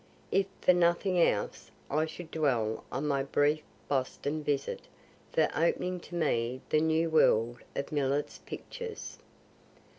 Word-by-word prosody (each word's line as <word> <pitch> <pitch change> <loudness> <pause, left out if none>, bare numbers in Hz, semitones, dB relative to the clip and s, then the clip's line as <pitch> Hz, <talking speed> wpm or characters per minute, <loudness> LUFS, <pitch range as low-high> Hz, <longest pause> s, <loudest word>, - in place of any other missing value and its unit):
If 195 0 +3
for 180 - +6
nothing 175 +1 +3
else, - - +1 0.2
I 155 +3 +1
should 160 0 -9
dwell 120 -8 0
on 135 +4 -2
my 140 -2 +2
brief 145 +2 +2 0.3
Boston 140 +2 -1
visit 140 -2 -1 0.5
for - - +3
opening 180 +2 +1
to 175 - -10
me 130 -6 0
the 155 - +4
new 160 +1 +2
world 120 -6 +4 0.2
of 140 - -3
Millet's 145 0 0
pictures. 470 -2 -7
150 Hz, 130 wpm, -31 LUFS, 135-170 Hz, 0.5 s, for